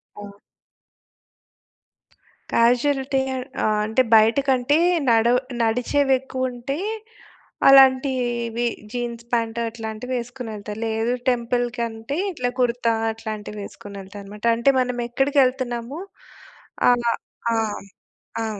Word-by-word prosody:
ఆ! 205 - -9 2.3
కాజుయాలిటీ‌ 265 +3 +2 0.4
ఆ - - +2 0.2
అంటే, 220 +4 +2
బయట 220 +3 +5
కంటే 260 +3 +3 0.3
నడవ 235 +2 +4 0.2
నడిచేవి 250 +5 +2
ఎక్కువ 260 -1 -3
ఉంటే 245 +3 -4 0.9
అలాంటివి 255 -3 +4 0.2
జీన్స్ 235 -1 -4
పాంట్ 230 0 0
అట్లాంటివి 225 +2 -5
ఎసుకొని 245 -1 -8
ఎళ్తారు. 210 +1 -7
లేదు 225 +2 0 0.2
టెంపుల్ 245 0 0
కంటే 230 +4 -3
ఇట్లా 250 -6 -2
కుర్తా 235 -1 +1 0.2
అట్లాంటివి 215 -2 -7
వేసుకొని 200 0 -10
వెళ్తా 195 +2 -11
అన్నమాట. 210 +3 -9
అంటే 235 +4 +3
మనం 250 -1 -1
ఎక్కడికి 275 +3 +1
ఎళ్తున్నాము? 255 +2 -3 0.9
ఆహ్, 240 -1 +2 0.4
ఆ! - - +1 0.9
ఆ! - - -1
240 Hz, 105 wpm, -22 LUFS, 225-255 Hz, 2.3 s, బయట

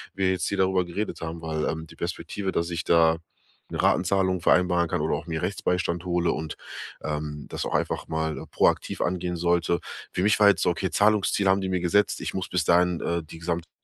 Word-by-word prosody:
wir 95 -1 +2
jetzt 95 -1 -1
hier 100 - -2
darüber 95 -1 +2
geredet 100 +3 -4
haben, 80 0 -5
weil, 80 -1 -2
ähm, 80 0 -3
die - - -15
Perspektive, 90 +3 -4
dass 85 0 -1
ich 85 -1 -2
da 80 -1 +4 0.5
'ne - - -2
Ratenzahlung 95 0 +2
vereinbaren 90 0 +3
kann - - -1
oder - - 0
auch 75 - -6
mir 80 0 -3
Rechtsbeistand 90 -2 -1
hole 90 -1 +1
und, 80 -1 -4 0.5
ähm, 75 -1 -4
das - - -3
auch - - -2
einfach - - -1
mal, 80 -1 -2
äh, - - -9
proaktiv - - +1
angehen 90 0 -1
sollte. 85 0 +1 0.3
Für 90 - -1
mich 105 +1 +3
war 105 - +7
jetzt - - +2
so: - - +3
„Okay, 95 +2 -2
Zahlungsziel 105 +1 +2
haben 95 +1 +4
die 95 - -2
mir 90 -1 0
gesetzt. 100 +4 +2
Ich - - -4
muss 95 -1 -3
bis 90 -2 +1
dahin, 90 0 +3
äh, 85 0 -1
die 80 +1 -11
gesamte 85 0 -3
85 Hz, 215 wpm, -26 LUFS, 80-95 Hz, 0.5 s, war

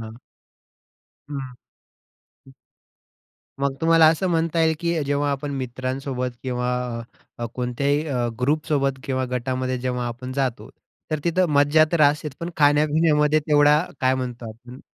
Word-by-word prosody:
हां. 110 -1 -8 1.2
हं, 140 -2 -3
हं. 130 -2 -12 1.9
मग 140 -1 0
तुम्हाला 165 0 +5
असं 165 +4 +1
म्हणता 165 0 +1
येईल, 160 0 +3
की 170 -2 0
जेव्हा 145 +1 0
आपण 140 +1 -3
मित्रांसोबत 130 0 -3
किंवा 125 -1 -2 0.7
अ, 120 - -3
कोणत्याही 140 +4 0
अ, 125 -5 -1
ग्रुपसोबत 140 -1 0
किंवा 130 -1 -1
गटामध्ये 130 +1 -2
जेव्हा 125 -1 -2
आपण 125 +2 -6
जातो, 130 -3 -2 0.4
तर 155 - 0
तिथं 180 +2 +2
मज्जा 145 +2 +5
तर 170 - +1
असतेच 150 0 +2
पण 170 +1 -4
खाण्यापिण्यामध्ये 150 +1 +3
तेवढा 150 0 +5 0.2
काय 130 0 +3
म्हणतो 125 -3 -5
आपण 120 +4 -13
140 Hz, 135 wpm, -23 LUFS, 130-150 Hz, 1.9 s, तुम्हाला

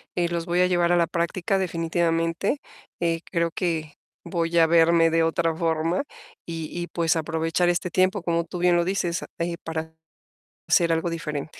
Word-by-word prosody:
eh, 175 -1 +1
los 170 -1 -2
voy 175 +1 +2
a 180 - +4
llevar 175 -1 +2
a 175 - +4
la 170 - +4
práctica, 175 +3 -1
definitivamente. 165 - 0 0.4
Eh, 165 -1 0
creo 170 -2 0
que 160 -4 -2 0.3
voy 170 -1 -1
a 165 - +7
verme 165 0 +5
de 165 0 +3
otra 165 0 +1
forma, 165 - 0 0.4
y 165 -2 -4
y 175 0 -4
pues, 165 -2 0
aprovechar 165 +2 0
este 175 +1 0
tiempo, 185 +3 +2
como 170 -1 +1
tú 180 - -7
bien 175 0 +4
lo 170 0 +2
dices, 180 -2 -1 0.2
eh, 170 0 -2
para 160 0 -5 0.7
hacer 170 -2 +4
algo 165 +1 0
diferente. 150 -2 -5
170 Hz, 175 wpm, -24 LUFS, 165-175 Hz, 0.7 s, a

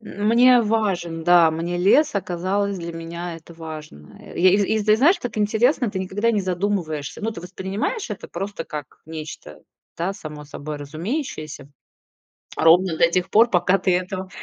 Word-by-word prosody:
Мне 235 +4 +4
важен, 195 -7 -1
да, 175 -2 +6
мне 170 +2 -3
лес 285 - +4
оказалось, 195 +2 -1
для 170 0 -6
меня 165 +1 -6
это 165 +1 -15
важно. 155 - -10
Э, - - -12
я 185 +2 +6
из 200 +2 +3
из, 215 +1 0
ты 215 0 +5
знаешь, 310 - +5
так 230 -7 -5
интересно, 225 +3 +2
ты 190 - -4
никогда 205 +5 0
не 210 - +1
задумываешься. 180 -6 -2
Ну, 225 - -1
ты 170 - -8
воспринимаешь 190 - -4
это 210 - -6
просто 195 -1 -5
как 150 -4 -8
нечто, 155 - -8 0.4
да, 175 +4 -1
само 150 -5 -9
собой 150 +1 -7
разумеющееся 155 - -5 0.9
ровно 170 +1 +4
до 170 - +4
тех 180 +1 0
пор, 230 +3 +5
пока 185 +1 +3
ты 185 -2 +2
этого 185 +1 -4
185 Hz, 165 wpm, -22 LUFS, 165-210 Hz, 0.9 s, да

